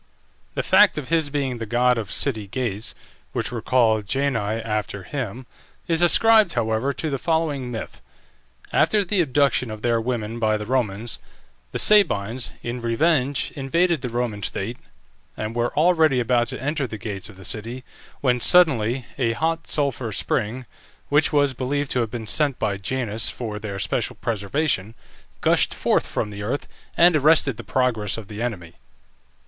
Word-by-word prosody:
The - - -1
fact - - +5
of 145 -4 -5
his 160 -3 +1
being 135 -4 -2
the 115 - -5
god 125 +1 +2
of 105 -3 -5
city 110 -7 0
gates, 110 -2 -3 0.4
which - - -2
were 120 -2 -4
called 110 -5 +2
Jani 135 -3 +1 0.2
after 105 -3 -3
him, 125 +1 -5 0.4
is 165 -1 +1
ascribed, 215 +2 +5
however, 115 +3 0
to 155 +2 -4
the 135 - -2
following 155 -6 -1
myth: 115 -2 -7 0.7
After 210 -2 +3
the 190 0 +2
abduction 140 -4 +2
of 110 0 -8
their 115 -1 +2
women 115 -1 -3
by 110 -1 +2
the 105 - -6
Romans, 115 -2 -1 0.5
the - - -3
Sabines, 125 - +3
in 120 +1 -4
revenge, 135 +3 +1
invaded 165 +3 +1
the 125 - -3
Roman 120 -3 -2
state, 110 +5 -3 0.6
and 110 +1 -4
were 120 0 0
already 160 -4 +4
about 120 0 +2
to - - -5
enter 145 +1 -1
the 110 - -6
gates 105 -1 -5
of 105 - -13
the 95 - -11
city, 115 +4 -3 0.4
when 125 -2 +2
suddenly 130 -7 +4
a 115 -3 +1
hot 165 +5 -1
sulphur 135 -6 -1
spring, 115 +5 -2 0.4
which 145 +1 +3
was 145 -3 +3
believed 135 +3 -2
to 125 - +1
have 115 -2 0
been 115 -1 -6
sent 140 +4 +1
by 105 -2 -1
Janus 110 +1 -2
for 110 -4 -5
their 100 -2 -5
special 95 -3 -2
preservation, 115 0 -1 0.5
gushed - - +3
forth - - +1
from 105 - -3
the 100 0 -7
earth, 115 +7 -3 0.3
and 175 0 +6
arrested 145 -4 +3
the 120 - -7
progress 115 -3 0
of 110 -3 -8
the 105 +1 -6
enemy. 95 -9 -4
125 Hz, 165 wpm, -23 LUFS, 110-145 Hz, 0.7 s, and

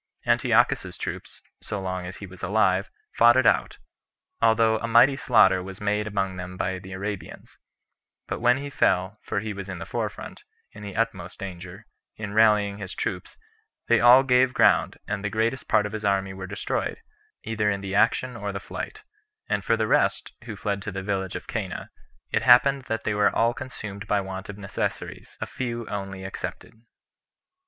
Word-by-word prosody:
Antiochus's - - +2
troops, - - -7 0.2
so 105 - -4
long 95 -1 -4
as 90 - -8
he 100 - -8
was 95 -1 -13
alive, - - +2 0.2
fought 120 +1 +6
it 130 - +3
out, - - +2 0.6
although 110 -1 +4
a 115 - -3
mighty 120 +4 +6
slaughter 95 -8 +4
was 95 +1 -9
made 105 +1 0
among 95 -2 -2
them 90 0 -7
by 95 0 -2
the 95 +1 -11
Arabians; 100 +1 -6 0.7
but - - -3
when 120 +1 +4
he 140 +1 -6
fell, 95 -3 +1
for 105 - -2
he 110 -1 -4
was 100 -1 -7
in 95 - -5
the - - -6
forefront, - - -5 0.3
in 105 - -12
the 100 -2 -7
utmost 100 -6 -2
danger, 95 +2 -8 0.3
in 105 -2 -5
rallying 105 -2 +4
his 95 -2 -7
troops, - - -4 0.5
they 120 - +5
all 125 +3 +8
gave 125 0 +3
ground, - - +4
and 100 -1 -3
the 100 - -1
greatest 115 +5 -1
part 105 - +3
of 105 - -4
his 110 -1 -5
army 95 -1 +1
were 95 0 -7
destroyed, 100 +1 -2 0.5
either 105 -1 0
in 100 -1 -1
the 95 -1 -5
action 115 +4 +2
or 100 -3 -4
the 100 - -4
flight; - - -7 0.4
and - - -1
for - - +2
the - - +1
rest, - - +1
who 110 -3 -6
fled 100 0 -2
to 100 - -5
the 95 0 -5
village 95 -2 -2
of - - -6
Cana, - - -5 0.4
it - - +1
happened 130 +2 +5
that 115 0 -3
they - - 0
were 105 0 +4
all 115 +3 +2
consumed 110 -6 -7
by 105 - +2
want 95 0 -6
of 100 - -7
necessaries, 100 -1 -5
a - - -2
few 120 -3 -4
only 95 -2 -5
excepted. 95 +3 -6
105 Hz, 185 wpm, -25 LUFS, 95-115 Hz, 0.7 s, all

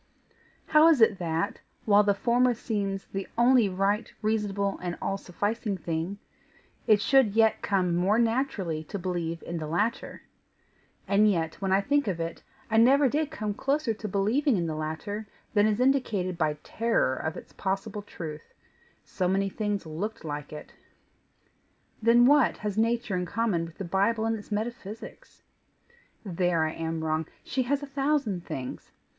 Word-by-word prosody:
How 310 +1 +6
is 325 -5 +5
it 220 -4 +4
that, 165 +3 -2 0.2
while 205 -1 +6
the 200 -1 +2
former 245 +3 +2
seems 200 -4 -3
the 195 0 -5
only 240 -3 +5
right, 200 +4 0
reasonable, 205 -2 0
and 175 -1 -4
all 195 - -1
sufficing 205 +2 -3
thing, 165 +3 -3 0.7
it 215 -2 +6
should 225 0 +3
yet 225 -1 +3
come 185 -3 +1
more 190 +5 +2
naturally 225 - 0
to 200 - -5
believe 175 -3 -3
in 170 -1 -4
the 155 - -4
latter? 205 +9 -2 0.8
And 205 +2 +4
yet, 165 -3 -1
when 190 -1 -1
I 195 +1 +4
think 285 +5 +1
of 180 -4 -1
it, 165 0 -4 0.3
I 220 - +3
never 270 +5 +6
did 300 +3 0
come 215 -10 -3
closer 275 +1 0
to 215 0 -6
believing 215 +7 +1
in 170 - 0
the 160 - -2
latter 160 +8 -4 0.3
than 210 -1 +4
is 215 +1 0
indicated 235 -9 +1
by 155 -3 0
terror 225 - +1
of 160 +4 -4
its - - -11
possible 195 +2 -3
truth 160 -6 -9 0.5
so 185 - -2
many 195 +1 +1
things 205 -2 -2
looked 165 +5 -5
like 145 -1 -5
it. 150 - -9 1.3
Then, 235 +2 +6
what 290 0 +4
has 210 -2 -3
nature 230 -2 0
in 180 -1 -2
common 205 -5 0
with 165 0 -12
the 195 - -5
Bible 205 +5 +1
and 225 0 +1
its 215 0 -10
metaphysics? 215 0 -6 0.8
There 175 -3 +1
I 155 - -1
am 160 0 -4
wrong 155 0 -1 0.2
she 260 - -1
has 285 0 +1
a - - -3
thousand 275 - -1
things. 130 -1 -6
205 Hz, 165 wpm, -27 LUFS, 175-230 Hz, 1.3 s, How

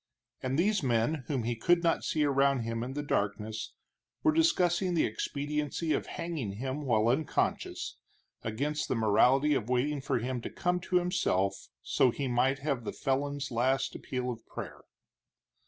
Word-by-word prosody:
And 130 +1 -1
these 205 +4 +2
men 125 +2 +1
whom 135 -5 -1
he 120 +1 -1
could 170 +9 +3
not 165 -1 +2
see 155 - +1
around 140 -2 +3
him 115 0 -3
in 125 +2 -4
the 145 - -2
darkness 105 -3 -2 0.5
were 315 - +5
discussing 185 - +2
the 160 - +3
expediency 150 +6 -2
of - - -1
hanging 165 - -4
him 130 +7 -4
while 110 -2 +3
unconscious, 140 +4 -1 0.4
against 140 +7 -2
the - - 0
morality 125 +7 +4
of 120 -4 -1
waiting 135 +3 +1
for 135 -1 0
him 125 +1 -2
to - - -5
come 180 0 0
to 185 - 0
himself 100 - +1 0.2
so 130 - +3
he 135 +3 -2
might 130 +2 +2
have 135 -6 0
the - - -3
felon's 140 0 -2
last 130 +3 +1
appeal 125 -1 -3
of 115 -2 -8
prayer. - - -7
135 Hz, 165 wpm, -30 LUFS, 120-150 Hz, 0.5 s, were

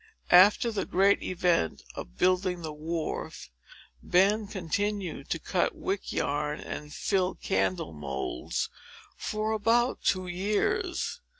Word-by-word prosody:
After 205 +6 +7
the 210 - -2
great 195 +2 +3
event 175 - 0
of - - -9
building 185 -1 +1
the 155 -1 -4
wharf, 155 - -4 0.5
Ben 200 +4 +3
continued 195 -3 -3
to - - 0
cut 175 +2 0
wick 195 +1 -3
yarn 150 +1 -1
and 150 0 -7
fill 185 +3 0
candle 95 -3 -1
moulds 70 -4 -3 0.5
for 215 0 -2
about 230 +3 +2
two 185 -1 +1
years. 345 - -1
185 Hz, 115 wpm, -28 LUFS, 155-205 Hz, 0.5 s, After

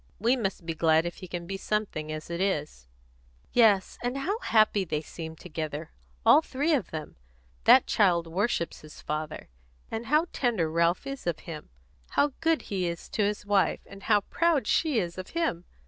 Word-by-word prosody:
"We 235 +6 +3
must 195 -8 -3
be 165 - -2
glad 160 0 +3
if 175 - -4
he 185 - -9
can 175 0 -5
be 195 +2 -4
something, 195 -7 -2
as 155 +2 -6
it 170 +1 -2
is." 150 - -2 0.7
"Yes, 210 -6 +4
and 245 +2 -2
how 390 +11 -1
happy 215 - +3
they 155 -4 -2
seem 160 0 -8
together, 155 -2 -5 0.3
all - - +8
three 295 +2 0
of 255 - 0
them! 155 - -7 0.5
That - - +8
child 175 -4 +3
worships 170 0 -1
his 155 0 -13
father; 155 0 -5 0.4
and 225 +1 -4
how 305 +4 +3
tender 215 - 0
Ralph 170 - +2
is 275 -7 -6
of 170 -3 -1
him! 160 -3 -8 0.4
How 290 -1 +2
good 325 -1 +2
he 185 -3 -2
is 170 -1 -5
to - - -1
his 205 0 0
wife; 205 -2 +2
and 195 0 -12
how 210 0 +3
proud 330 - +1
she 305 +3 +2
is 175 -3 -2
of 185 - -7
him! 180 - 0
190 Hz, 185 wpm, -28 LUFS, 165-235 Hz, 0.7 s, all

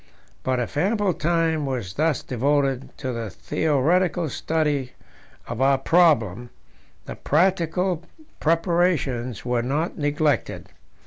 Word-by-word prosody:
But 130 -1 0
if 125 +3 -4
ample 200 +3 +1
time 160 -2 0
was 120 -9 -3
thus 155 +2 0
devoted 135 +1 0
to 130 -3 -4
the 115 -2 -4
theoretical 160 - 0
study 145 -3 -1 0.5
of 125 - -4
our 135 0 +4
problem, 125 - +2 0.6
the - - -6
practical 175 +1 +1 0.4
preparations 165 - 0
were 125 -1 +1
not 145 +9 -2
neglected. 145 -3 0
150 Hz, 110 wpm, -23 LUFS, 130-165 Hz, 0.6 s, our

